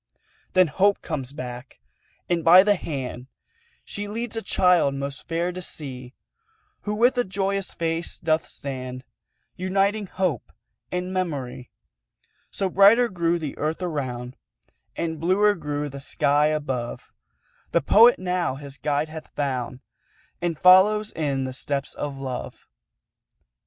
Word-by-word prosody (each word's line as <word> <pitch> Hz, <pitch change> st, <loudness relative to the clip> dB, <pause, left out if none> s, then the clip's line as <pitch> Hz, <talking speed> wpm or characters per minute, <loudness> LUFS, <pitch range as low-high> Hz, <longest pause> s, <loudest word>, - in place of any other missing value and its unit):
Then 185 Hz, 0 st, +6 dB
Hope 195 Hz, +6 st, +2 dB
comes 135 Hz, -6 st, -4 dB
back, 125 Hz, -2 st, -8 dB, 0.5 s
and 170 Hz, -2 st, 0 dB
by 180 Hz, +3 st, +9 dB
the 205 Hz, 0 st, +4 dB
hand 130 Hz, -8 st, -5 dB, 0.6 s
She 205 Hz, 0 st, -5 dB
leads 230 Hz, +2 st, -4 dB
a 225 Hz, -, -1 dB
child 180 Hz, -7 st, +3 dB
most 140 Hz, +1 st, -5 dB
fair 170 Hz, +2 st, -1 dB
to 185 Hz, +1 st, -7 dB
see, 130 Hz, -7 st, -7 dB, 0.7 s
Who 210 Hz, 0 st, -1 dB
with 245 Hz, +4 st, +3 dB
a -, -, +3 dB
joyous 195 Hz, 0 st, -2 dB
face 165 Hz, 0 st, -2 dB
doth 160 Hz, 0 st, 0 dB
stand 130 Hz, -2 st, -6 dB, 0.5 s
Uniting 195 Hz, +3 st, 0 dB
Hope 170 Hz, -, -2 dB, 0.4 s
and 180 Hz, +1 st, -3 dB
Memory. 140 Hz, -9 st, -3 dB, 0.8 s
So 195 Hz, -, -1 dB
brighter 205 Hz, +6 st, +6 dB
grew 170 Hz, -2 st, 0 dB
the 155 Hz, -4 st, -5 dB
Earth 155 Hz, +4 st, -2 dB
around, 130 Hz, -7 st, -4 dB, 0.6 s
And 160 Hz, -2 st, -3 dB
bluer 195 Hz, +5 st, +3 dB
grew 150 Hz, -4 st, -3 dB
the 140 Hz, 0 st, -8 dB
sky 145 Hz, +2 st, +2 dB
above; 135 Hz, -6 st, -3 dB, 0.6 s
The -, -, +3 dB
Poet 230 Hz, -, +6 dB
now 180 Hz, -6 st, -1 dB
his 140 Hz, 0 st, -9 dB
guide 150 Hz, +1 st, 0 dB
hath 160 Hz, 0 st, -8 dB
found, 130 Hz, -3 st, -2 dB, 0.6 s
And 170 Hz, -2 st, -1 dB
follows 200 Hz, +5 st, +6 dB
in 140 Hz, -4 st, -1 dB
the 130 Hz, 0 st, -4 dB
steps 140 Hz, +1 st, -3 dB
of 145 Hz, -2 st, -5 dB
Love. 130 Hz, -2 st, -6 dB
160 Hz, 135 wpm, -24 LUFS, 140-185 Hz, 0.8 s, by